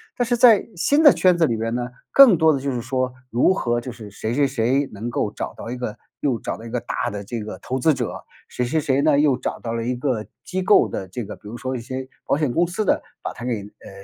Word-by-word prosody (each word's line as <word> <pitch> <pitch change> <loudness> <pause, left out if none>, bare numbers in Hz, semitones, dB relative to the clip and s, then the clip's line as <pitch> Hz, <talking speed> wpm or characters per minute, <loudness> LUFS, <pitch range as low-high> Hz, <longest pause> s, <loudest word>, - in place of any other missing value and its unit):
但 245 - 0
是 240 0 0
在 230 -4 +6
新 285 - +2
的 290 - +10
圈 180 -2 +3
子 165 - +4
里 115 -6 0
边 115 +1 -2
呢， 125 0 -3 0.2
更 255 -11 +8
多 160 0 +5
的 135 - -1
就 140 0 -2
是 120 -2 -3
说， 130 +1 -2 0.2
如 125 +11 +3
何 120 -9 0
就 125 - -6
是 110 -3 -10
谁 110 +3 -4
谁 140 +1 +3
谁 130 +2 +1
能 110 +4 -5
够 105 -3 -1
找 - - -5
到 115 - -7
一 - - -3
个 125 -4 -5 0.2
又 130 -5 0
找 - - -4
到 - - -12
一 - - -7
个 - - -2
大 - - -3
的 100 0 -6
这 115 +3 -5
个 105 +1 -7
投 130 +1 -4
资 155 +3 +3
者， 125 -2 -4 0.2
谁 125 - -3
谁 135 +6 0
谁 140 -2 +1
呢， 145 -1 +4
又 145 -3 +4
找 - - -3
到 115 -1 -4
了 115 0 -2
一 125 +1 -1
个 125 -4 -1 0.2
机 185 +1 -2
构 185 - +5
的 95 -2 -5
这 115 +5 -6
个 100 - -8
比 - - -15
如 115 +3 -7
说 130 +1 -4
一 120 - -4
些 130 +2 -6 0.2
保 - - +2
险 150 -5 0
公 175 +5 +2
司 200 +5 -2
的， - - +2 0.2
把 - - -4
它 120 - -10
给， 120 -4 -2
呃， 105 - -14
125 Hz, 300 characters per minute, -22 LUFS, 115-155 Hz, 0.2 s, 的